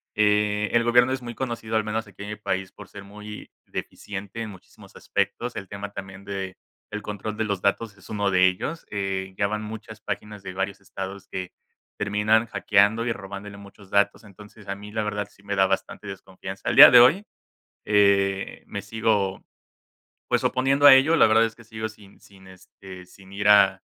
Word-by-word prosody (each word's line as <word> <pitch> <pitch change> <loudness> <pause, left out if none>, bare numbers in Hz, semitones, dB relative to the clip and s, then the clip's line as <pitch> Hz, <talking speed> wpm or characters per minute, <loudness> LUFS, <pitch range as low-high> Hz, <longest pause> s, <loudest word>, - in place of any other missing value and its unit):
Eh, 105 0 +2
el 120 0 +4
gobierno 125 +2 +4
es 130 - -3
muy 120 -1 -7
conocido, 115 -3 -4
al 110 - +1
menos 110 0 -3
aquí 100 0 -11
en 100 - -7
mi - - -4
país, 95 -2 -3
por - - -13
ser 100 - -10
muy 105 +1 -10 0.2
deficiente 100 +2 -7
en 110 - -4
muchísimos 95 -3 -15
aspectos. 120 0 -2
El 100 - -7
tema 100 0 -6
también 95 0 -9
del 100 +2 -8
control 105 +1 -5
de 110 - 0
los 100 -3 -2
datos 100 +1 0
es 100 - -17
uno 100 -2 0
de 95 0 +5
ellos, 150 - -3
eh, 95 -2 -3
ya 100 - +1
van 105 +1 -3
muchas 110 0 -9
páginas 105 -2 -6
de 95 - -7
varios 95 +1 -3
estados 95 0 -7
que 95 -1 -6 0.4
terminan 105 +3 +2
hackeando 110 +3 +2
y 115 - 0
robándole 100 0 -9
muchos 100 0 -15
datos. 100 +2 +2
Entonces 105 +1 -15
a 100 - -3
mí 105 +1 -11
la 110 0 -2
verdad 105 -1 -3
sí - - -23
me 100 0 -3
da 95 0 +4
bastante 95 +2 -3
desconfianza. 95 0 -9
Al - - 0
día - - +11
de - - +9
hoy, 160 +12 +5 0.6
eh, 100 -2 +2
me - - -5
sigo, 110 -4 0 0.9
pues, - - +1
oponiendo 135 +2 +3
a 135 - +11
ello, 140 +5 +4
la - - +6
verdad 110 +1 +4
es 115 - -3
que 120 - -15
sigo 110 0 -5
sin 105 -2 -18
sin, 95 -1 -18
este, 95 0 -13
sin 95 +1 -17
ir 100 +1 -1
a 105 -1 +5
105 Hz, 195 wpm, -24 LUFS, 100-110 Hz, 0.9 s, día